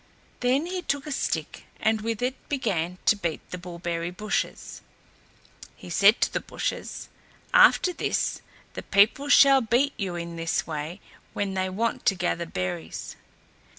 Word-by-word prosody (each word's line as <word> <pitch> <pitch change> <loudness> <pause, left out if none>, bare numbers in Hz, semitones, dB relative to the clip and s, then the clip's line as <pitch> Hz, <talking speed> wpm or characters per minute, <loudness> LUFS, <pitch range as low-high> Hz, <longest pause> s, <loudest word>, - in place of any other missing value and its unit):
Then 255 +5 +2
he 365 +1 -3
took 285 -4 -2
a 300 - -6
stick 275 - -3
and 220 0 +1
with 225 +1 -3
it 255 +1 -3
began 185 - -1
to - - +5
beat 170 -6 -4
the 180 - -5
bullberry 170 -1 -4
bushes. 210 +4 -3 0.9
He 175 - -11
said 200 +6 +5
to - - +1
the - - 0
bushes, - - -4 0.5
"After 360 - +6
this, - - -1 0.3
the - - -5
people 215 +8 +3
shall 275 -1 +7
beat 250 +5 +2
you 190 -4 -3
in 170 0 -6
this 165 0 -1
way 155 +6 -5 0.3
when 200 -1 -2
they 185 0 -1
want 225 +5 -2
to 195 - +4
gather 175 -1 -1
berries." 90 - -5
200 Hz, 150 wpm, -26 LUFS, 170-250 Hz, 0.9 s, shall